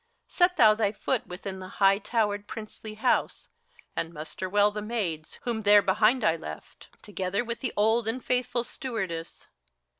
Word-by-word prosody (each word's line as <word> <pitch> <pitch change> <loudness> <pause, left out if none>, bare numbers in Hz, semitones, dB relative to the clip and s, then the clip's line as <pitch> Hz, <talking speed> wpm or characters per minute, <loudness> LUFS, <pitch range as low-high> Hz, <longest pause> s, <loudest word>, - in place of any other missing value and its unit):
Set 360 0 +2
thou 220 -3 +7
thy 210 -2 +1
foot 240 +3 -2
within 190 +1 -6
the 185 - -8
high 195 0 +5
towered 210 -2 -1
princely 215 -1 -8
House, 215 - 0 0.5
And 165 - -2
muster 165 +4 -6
well 205 +1 +4
the 210 0 -5
maids, 200 -9 -3
whom 235 -2 -2
there 205 -1 +6
behind 215 +5 +3
I 165 -5 +3
left, 75 - -10
Together 195 +2 -2
with 235 0 -4
the 260 - -2
old 220 +2 +3
and 240 +3 -3
faithful 250 -1 0
Stewardess. 195 -11 -5
210 Hz, 160 wpm, -27 LUFS, 190-230 Hz, 0.5 s, thou